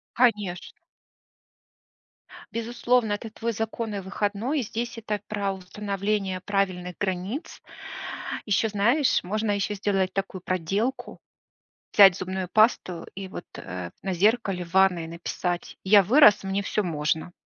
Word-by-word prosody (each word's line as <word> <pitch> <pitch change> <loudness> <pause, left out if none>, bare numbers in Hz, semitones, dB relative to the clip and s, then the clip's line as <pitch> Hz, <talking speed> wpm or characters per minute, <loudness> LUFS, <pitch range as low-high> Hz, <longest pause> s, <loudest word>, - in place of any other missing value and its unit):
Конечно. 210 -7 0 1.7
Безусловно, 235 -1 +1
это 210 +2 -5
твой 230 +1 -3
законный 220 -1 -3
выходной. 205 +8 -1
И - - -1
здесь 235 +2 -4
это 210 -2 -3
про 200 -2 -1
установление 195 0 -3
правильных 185 -3 -1
границ. 195 - -3 0.8
Ещё 215 +1 +2
знаешь, 235 +7 +2
можно 215 +3 -1
ещё 205 +1 0
сделать 195 -2 0
такую 195 -1 -3
проделку: 195 +9 -2 0.7
взять 195 -4 +8
зубную 185 -1 -4
пасту 215 -6 +2
и 195 -1 -6
вот, 185 - -8
э, 90 -1 -6
на 190 - -1
зеркале 195 -1 +1
в 170 - -16
ванной 185 -4 +4
написать: 175 +1 -4
"Я 200 +1 +6
вырос, 220 0 +6
мне 195 +1 -1
всё 210 +1 0
можно". 160 0 -1
200 Hz, 125 wpm, -26 LUFS, 185-220 Hz, 1.7 s, взять